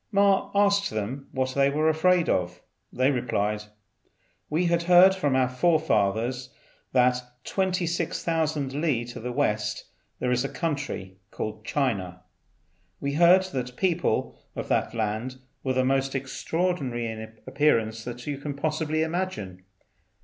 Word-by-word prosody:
Ma 200 Hz, -1 st, +3 dB
asked 200 Hz, 0 st, +3 dB
them 115 Hz, +6 st, -4 dB
what 130 Hz, 0 st, -1 dB
they 140 Hz, 0 st, +3 dB
were 155 Hz, +3 st, +1 dB
afraid 165 Hz, +2 st, +3 dB
of. 90 Hz, 0 st, 0 dB, 0.3 s
They 130 Hz, +3 st, +2 dB
replied, 105 Hz, -5 st, -1 dB, 0.8 s
"We 160 Hz, +4 st, +1 dB
had 170 Hz, 0 st, +2 dB
heard 180 Hz, +2 st, +7 dB
from 145 Hz, -8 st, 0 dB
our 130 Hz, -1 st, +3 dB
forefathers 125 Hz, -, +1 dB, 0.4 s
that 125 Hz, -1 st, +3 dB, 0.2 s
26,000 165 Hz, -5 st, -1 dB
li 135 Hz, -8 st, +1 dB
to 120 Hz, -, -8 dB
the 125 Hz, +2 st, -4 dB
west 105 Hz, -6 st, -1 dB, 0.3 s
there 125 Hz, -, -1 dB
is 125 Hz, +1 st, +2 dB
a 140 Hz, -, -2 dB
country 140 Hz, -, -4 dB
called 110 Hz, +1 st, -5 dB
China. 95 Hz, -12 st, -1 dB, 0.8 s
We 140 Hz, 0 st, -2 dB
had 170 Hz, +3 st, +5 dB
heard 185 Hz, +2 st, +7 dB
that 125 Hz, -2 st, -2 dB
the 125 Hz, -, -11 dB
people 175 Hz, +3 st, 0 dB, 0.2 s
of -, -, -5 dB
that -, -, 0 dB
land 110 Hz, +3 st, -2 dB, 0.3 s
were 130 Hz, -, 0 dB
the 130 Hz, 0 st, +2 dB
most 135 Hz, 0 st, +1 dB
extraordinary 135 Hz, -2 st, -2 dB
in 110 Hz, 0 st, -7 dB
appearance 115 Hz, -7 st, +1 dB, 0.2 s
you 145 Hz, -2 st, -3 dB
can 145 Hz, 0 st, -5 dB
possibly 155 Hz, +1 st, 0 dB
imagine. 160 Hz, -, -4 dB
135 Hz, 140 wpm, -26 LUFS, 115-165 Hz, 0.8 s, heard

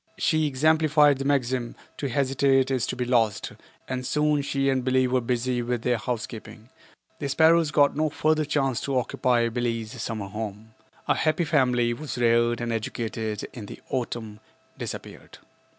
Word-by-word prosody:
She 155 Hz, -2 st, +2 dB
exemplified 150 Hz, 0 st, +3 dB
the 135 Hz, -, -3 dB
maxim, 130 Hz, -3 st, 0 dB, 0.2 s
"To 140 Hz, -, -3 dB
hesitate 135 Hz, +1 st, +2 dB
is 130 Hz, -3 st, 0 dB
to -, -, -3 dB
be 125 Hz, -, -2 dB
lost," 115 Hz, -4 st, +1 dB, 0.4 s
and 130 Hz, -1 st, -3 dB
soon 150 Hz, +2 st, +1 dB
she 140 Hz, -1 st, -1 dB
and 130 Hz, -2 st, +1 dB
Billie 130 Hz, 0 st, +2 dB
were 125 Hz, 0 st, +1 dB
busy 125 Hz, +1 st, -1 dB
with 120 Hz, -1 st, -2 dB
their 125 Hz, -1 st, +2 dB
housekeeping. 115 Hz, -1 st, -6 dB, 0.5 s
The 140 Hz, -, -3 dB
sparrows 160 Hz, +2 st, +4 dB
got 145 Hz, -1 st, +3 dB
no 155 Hz, +1 st, +1 dB
further 155 Hz, +1 st, +1 dB
chance 135 Hz, -4 st, 0 dB
to 135 Hz, -2 st, -1 dB
occupy 120 Hz, -1 st, +1 dB
Billie's 115 Hz, -1 st, -3 dB
summer 110 Hz, -3 st, -4 dB
home. 105 Hz, +1 st, -6 dB, 0.3 s
A -, -, +4 dB
happy 155 Hz, +2 st, +1 dB
family 125 Hz, -6 st, +2 dB
was 145 Hz, +1 st, -6 dB
reared 120 Hz, 0 st, +2 dB
and 120 Hz, -1 st, -2 dB
educated 110 Hz, -1 st, -3 dB
and -, -, -16 dB
in 115 Hz, -4 st, -7 dB
the -, -, -9 dB
autumn 115 Hz, -4 st, -3 dB, 0.4 s
disappeared. -, -, -8 dB
125 Hz, 165 wpm, -25 LUFS, 115-140 Hz, 0.5 s, sparrows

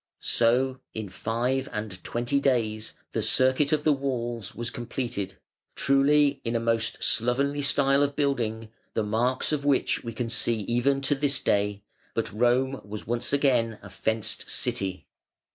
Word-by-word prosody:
So 130 Hz, +3 st, +2 dB, 0.2 s
in 110 Hz, -3 st, -4 dB
five 125 Hz, +7 st, -1 dB
and 105 Hz, -4 st, -5 dB
twenty 120 Hz, +4 st, 0 dB
days 115 Hz, -6 st, 0 dB, 0.2 s
the -, -, -1 dB
circuit 130 Hz, +3 st, +3 dB
of 150 Hz, -1 st, +1 dB
the 155 Hz, -, +4 dB
walls 120 Hz, -6 st, -3 dB
was 120 Hz, 0 st, -4 dB
completed, 120 Hz, -4 st, -4 dB, 0.4 s
truly 140 Hz, +1 st, +3 dB
in 115 Hz, 0 st, -2 dB
a -, -, +2 dB
most 115 Hz, -1 st, 0 dB
slovenly 140 Hz, +5 st, +2 dB
style 140 Hz, 0 st, +3 dB
of 145 Hz, 0 st, +1 dB
building, 115 Hz, -6 st, -1 dB, 0.2 s
the 110 Hz, -, +1 dB
marks 120 Hz, +7 st, 0 dB
of 150 Hz, -2 st, -1 dB
which 140 Hz, -2 st, +1 dB
we 115 Hz, -, -5 dB
can 120 Hz, +1 st, -3 dB
see 115 Hz, -1 st, +1 dB
even 120 Hz, +6 st, +1 dB
to 140 Hz, -, +2 dB
this 140 Hz, -1 st, +1 dB
day, 105 Hz, -2 st, 0 dB, 0.3 s
but -, -, -2 dB
Rome 125 Hz, +4 st, +2 dB
was 105 Hz, +1 st, -7 dB
once 120 Hz, +1 st, -1 dB
again 125 Hz, -6 st, +2 dB
a 100 Hz, -, -11 dB
"fenced 110 Hz, +3 st, -2 dB
city". 95 Hz, -2 st, -2 dB
120 Hz, 155 wpm, -27 LUFS, 110-135 Hz, 0.4 s, the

